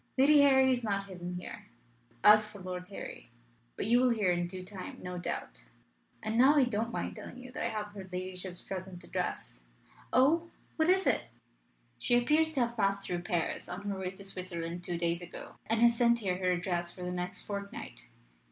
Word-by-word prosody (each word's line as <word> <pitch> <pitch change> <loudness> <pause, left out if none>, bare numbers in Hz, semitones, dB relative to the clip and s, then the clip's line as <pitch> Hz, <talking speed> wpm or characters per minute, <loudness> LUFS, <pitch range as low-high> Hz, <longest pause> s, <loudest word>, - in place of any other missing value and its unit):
Lady 285 +2 +7
Harry 265 -2 +6
is 245 -1 -2
not 200 -2 0
hidden 180 -2 -6
here. 180 - -7 0.6
As 215 +1 +8
for 210 -1 -10
Lord 180 -1 -5
Harry 195 - -8 0.5
but - - -1
you 235 +3 +5
will 255 0 +4
hear 210 -6 +2
in 175 0 0
due 185 +1 -5
time 185 0 -7
no 180 0 -4
doubt. - - -5 0.6
And 220 +2 0
now 270 +4 +7
I 285 - +6
don't 230 -1 -1
mind - - -3
telling - - -9
you 255 0 -9
that - - -4
I - - +1
have 210 -1 -4
her 200 -2 -7
ladyship's 185 0 -5
present 185 -2 -6
address." - - -4 0.5
"Oh! 315 +7 +4 0.3
What 320 +1 +2
is 380 +1 +4
it?" - - +2 0.7
"She 245 - +3
appears 305 +6 +3
to 270 - +1
have 235 0 0
passed 200 -1 +1
through 175 -1 -2
Paris 175 -3 -2
on 180 +2 -5
her 195 -1 -3
way 185 -1 -2
to 195 +1 -10
Switzerland 175 -2 -4
two 175 0 -2
days 170 0 0
ago, 175 - -8
and 225 +1 +2
has 235 0 +6
sent 235 0 +4
here 185 -3 0
her 185 -1 +2
address 175 -1 -1
for 180 - -7
the 180 - -2
next 180 0 -3
fortnight. 200 - -6
195 Hz, 200 wpm, -31 LUFS, 180-235 Hz, 0.7 s, As